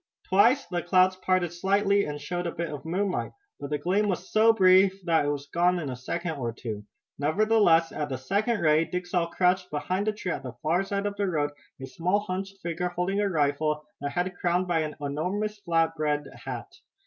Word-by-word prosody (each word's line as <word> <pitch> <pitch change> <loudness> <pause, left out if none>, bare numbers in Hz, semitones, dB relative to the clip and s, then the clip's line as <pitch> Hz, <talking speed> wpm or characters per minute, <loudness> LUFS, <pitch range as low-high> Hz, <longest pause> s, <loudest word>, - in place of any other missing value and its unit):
Twice 215 +7 +4
the 175 0 -2
clouds 185 +1 +3
parted 185 -2 0
slightly 200 +3 +2
and 145 0 -5
showed 175 +4 -3
a - - -2
bit 165 -1 -4
of 145 0 -7
moonlight, 185 +3 -1 0.3
but 140 - -6
the 150 - 0
gleam 190 +8 +1
was 185 -1 -3
so 220 +1 +6
brief 190 -2 +5
that 165 -4 +3
it - - +1
was 145 -1 -3
gone 175 +4 +2
in 150 -6 -3
a - - -4
second 160 +6 -4
or 120 -3 -2
two. 110 -2 -6 0.4
Nevertheless 170 +1 +3
at 150 -1 -3
the 130 - -3
second 205 - 0
ray 155 0 +4
Dick 180 +1 -4
saw 175 -1 0
crouched 180 +2 +1
beside 185 +7 -2
a - - +3
tree 210 -4 -4
at - - -3
the 130 -3 -7
far 170 +5 +2
side 200 +1 -2
of 205 -1 -2
the 200 - 0
road 150 -5 0 0.3
a 130 - -6
small 170 +10 0
hunched 195 0 -4
figure 170 +1 -2
holding 180 +3 -1
a 205 -1 +1
rifle, 150 -1 0
the 145 - -3
head 180 +4 -2
crowned 180 +1 +1
by 170 -2 +1
an 155 -1 -3
enormous 180 +9 -2
flap 165 -3 +1
brimmed 150 -2 -1 0.2
hat. - - -4
175 Hz, 210 wpm, -27 LUFS, 150-195 Hz, 0.4 s, so